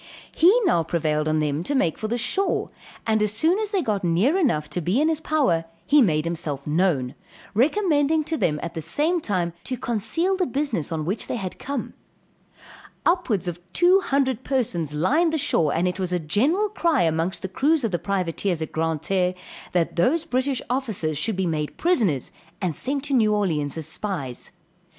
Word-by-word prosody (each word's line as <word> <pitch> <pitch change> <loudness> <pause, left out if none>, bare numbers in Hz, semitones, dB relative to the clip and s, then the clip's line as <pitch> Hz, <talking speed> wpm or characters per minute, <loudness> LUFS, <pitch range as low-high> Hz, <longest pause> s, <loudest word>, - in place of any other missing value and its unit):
He 345 +3 +6 0.4
prevailed 155 -2 0
on 155 0 +1
them 150 0 0
to 280 +11 -2
make 170 - +2
for 215 - -2
the 235 +2 -1
shore, 380 - 0 0.3
and 220 -1 +2
as 210 -1 +2
soon 320 - +2
as 430 -2 -2
they 395 -4 0
got 205 -3 -1
near 180 - +2
enough 230 - +1
to 180 - -1
be 180 - +1
in 310 +2 +3
his 320 -2 0
power, 265 - +1 0.2
he 295 0 +5
made 155 -8 +2
himself 160 -5 -3
known, 150 -5 +1 0.4
recommending 310 - +2
to 320 +2 -2
them 150 - 0
at 170 - -5
the 160 - -4
same 310 - +1
time 180 - -1
to 255 - -3
conceal 250 - -1
the 370 -1 0
business 260 - -2
on 155 -2 -2
which 200 +6 -2
they - - -2
had 190 -6 -5
come. 275 -3 -4 1.1
Upwards 335 - +1
of 175 0 -4
two 360 +3 +5
hundred 265 - 0
persons 175 - -1
lined 300 - +2
the - - +2
shore, 165 - +1
and 175 +2 +1
it 180 +1 -3
was 185 -1 -2
a 180 - +2
general 265 - +1
cry 335 - +1
amongst 165 +4 0
the - - -1
crews 285 - +1
of 225 - 0
the 175 - -1
privateers 180 -1 -1
at 155 - -7
Grand 160 -1 -1
Terre, 185 -1 +1 0.4
that 175 -1 0
those 300 - +2
British 260 -3 -1
officers 220 - -1
should 170 +9 -1
be 190 0 -1
made 155 -3 -2
prisoners 215 - +1 0.3
and 180 -5 -1
sent 270 - -2
to 290 -1 -2
New 215 -4 +3
Orleans 160 -8 -1
as 160 - -4
spies. 150 - -3
205 Hz, 190 wpm, -24 LUFS, -, 1.1 s, He